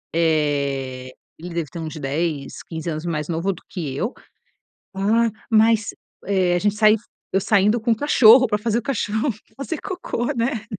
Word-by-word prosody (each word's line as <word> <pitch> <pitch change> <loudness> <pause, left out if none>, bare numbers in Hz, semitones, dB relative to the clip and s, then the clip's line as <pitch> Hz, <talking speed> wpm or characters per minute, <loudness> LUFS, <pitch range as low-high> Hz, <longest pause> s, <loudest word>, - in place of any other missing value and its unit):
eh, 140 -5 0 0.3
ele 175 +1 -8
deve 165 -4 -2
ter 170 - -7
uns 160 0 -5
10, 145 0 -3
15 160 0 -6
anos 155 +1 -4
mais 155 -3 -2
novo 170 +4 -1
do 175 - -14
que 150 -8 -5
eu. 220 - -2 0.8
"Ah, 220 +4 +2 0.2
mas" 220 -1 +3 0.3
eh, 185 -3 +2
a - - +2
gente 205 +1 +1
sain 215 0 +5 0.4
eu 195 - +2
saindo 210 +3 +3
com 235 +2 -1
o - - +1
cachorro 255 -1 +6
pra 210 -3 0
fazer 225 +1 0
o - - -3
cachorro 220 0 -1 0.3
fazer 290 +3 -4
cocô, 370 - -4
né? 230 -2 -1
195 Hz, 175 wpm, -22 LUFS, 160-225 Hz, 0.8 s, cachorro